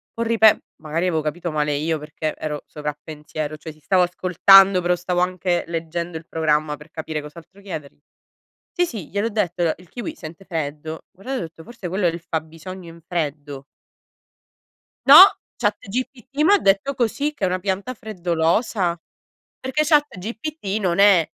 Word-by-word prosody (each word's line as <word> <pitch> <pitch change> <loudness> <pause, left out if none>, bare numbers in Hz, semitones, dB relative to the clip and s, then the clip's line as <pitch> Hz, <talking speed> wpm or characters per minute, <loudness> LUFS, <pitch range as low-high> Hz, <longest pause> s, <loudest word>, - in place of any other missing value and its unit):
può 230 - -1
ripe” 225 -2 +4 0.2
magari 160 +3 -2
avevo 165 -4 +1
capito 165 +3 -3
male 150 -1 0
io 155 +2 -1
perché 150 +1 -4
ero 150 -1 -5
sovrappensiero, 150 0 -6
cioè 160 +1 -9
sì, 155 - -19
stavo 185 +5 +2
ascoltando, 185 +2 +6
però 180 0 +2
stavo 180 0 -2
anche 180 -1 0
leggendo 170 0 -4
il 160 - -11
programma 155 -2 0
per 150 +2 -15
capire 160 -1 -5
cos'altro 165 +6 -13
chiedergli. 160 -9 -8 0.7
"Sì, 355 - +2
sì, 215 - -7
gliel'ho 205 +3 -1
detto, 185 -5 -1
alo 165 -2 +2
il 180 +1 -17
kiwi 245 - -6
sente 165 +3 -10
freddo". 155 -2 -5
Guardato, 250 +9 -6
ho - - -4
detto: 165 0 -10
"Forse 230 -2 -8
quello 185 +2 -1
è - - +4
il 170 +1 -5
fabbisogno 165 +3 -6
in 165 - -15
freddo". 150 -5 -4 1.4
“No, - - +9 0.4
ChatGPT 255 +5 -3
m'ha 410 +4 +6
detto 195 - +2
così, 275 +4 -1
che 285 - -9
è - - +4
una 185 +1 -1
pianta 195 +5 -2
freddolosa”. 180 -2 0 0.6
Perché 265 +4 -1
ChatGPT 270 - -1
non 180 -1 0
è, 195 -5 +6
175 Hz, 160 wpm, -22 LUFS, 160-200 Hz, 1.4 s, No